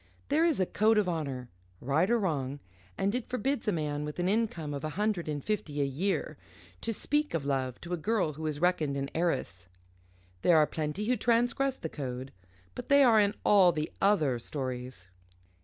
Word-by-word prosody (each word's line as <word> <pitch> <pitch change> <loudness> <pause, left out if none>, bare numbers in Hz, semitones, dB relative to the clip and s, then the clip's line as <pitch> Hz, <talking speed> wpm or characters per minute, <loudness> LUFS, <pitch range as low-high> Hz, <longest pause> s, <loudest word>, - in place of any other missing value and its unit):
There 310 +3 +3
is 330 -8 +2
a 185 - +3
code 215 +4 +2
of 210 -3 +3
honour, 140 -7 -3 0.3
right 150 - +1
or 240 - +4
wrong, 145 - -2 0.4
and 200 +1 0
it 250 -1 -3
forbids 255 +1 -1
a - - +3
man 150 -4 -2
with 150 0 -6
an 175 0 0
income 195 -8 -1
of 140 - -5
a 155 - -2
hundred 210 -5 0
and 145 -2 -4
fifty 165 -9 -2
a 140 - +2
year 165 +9 -2 0.4
to 230 - -2
speak 295 - -1
of 150 -4 -2
love 130 -3 -1
to 175 +1 -5
a - - 0
girl 185 -2 0
who 155 +2 -5
is 150 -1 -3
reckoned 160 -5 +1
an 140 0 -3
heiress. 135 - -2 0.7
There 170 - +5
are 155 - +6
plenty 155 +7 -3
who 250 +2 +1
transgress 245 +4 +1
the 160 - -5
code, 130 -3 -6 0.4
but - - -7
they 280 0 +6
are 230 -4 +6
in 205 0 +2
all 190 -4 +6
the 155 -2 -3
other 155 -12 +3
stories. 125 -6 -5
165 Hz, 195 wpm, -30 LUFS, 145-215 Hz, 0.7 s, are